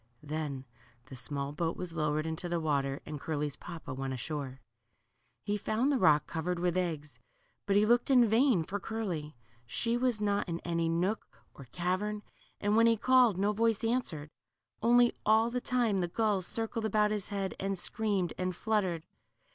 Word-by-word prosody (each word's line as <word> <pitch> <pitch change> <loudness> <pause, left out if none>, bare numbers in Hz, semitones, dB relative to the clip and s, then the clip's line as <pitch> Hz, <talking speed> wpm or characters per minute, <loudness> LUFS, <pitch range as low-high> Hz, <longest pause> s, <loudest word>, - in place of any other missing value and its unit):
Then 145 -3 -4 0.5
the - - -6
small 140 +2 -4
boat 165 +2 -2
was 180 -2 -5
lowered 155 -1 0
into 160 +2 -4
the 170 0 0
water, 140 -3 -1
and 150 - -6
Curly's 150 -1 -2
papa 165 -5 -8
went 135 0 -3
ashore. 135 0 -5 0.8
He 205 0 -1
found 225 +7 0
the 270 - +1
rock 155 -6 +5
covered 175 +2 -2
with 175 0 0
eggs, 160 -5 -3 0.5
but 200 - +2
he 205 +1 +5
looked 240 +4 +3
in 250 -3 +6
vain 225 - +3
for 200 +5 -4
Curly. 175 - -4 0.3
She 230 - 0
was 245 -3 +1
not 205 -2 0
in 170 0 -2
any 170 -1 -1
nook 180 +6 0 0.3
or 140 - -12
cavern, 185 - -2 0.4
and 205 +1 +1
when 230 +1 +6
he 230 -1 +4
called 250 -3 +4
no 205 +2 +1
voice 225 0 +1
answered. 205 -11 -1 0.5
Only, 240 +1 +5
all 220 +2 +4
the 250 +1 -2
time, 240 -7 +1
the 175 - 0
gulls 200 -1 0
circled 225 0 -2
about 210 0 +2
his 210 -2 -2
head, 195 -2 -3
and 195 0 -2
screamed, 195 -2 0
and 185 -1 -1
fluttered. 190 -7 0
185 Hz, 175 wpm, -31 LUFS, 160-220 Hz, 0.8 s, in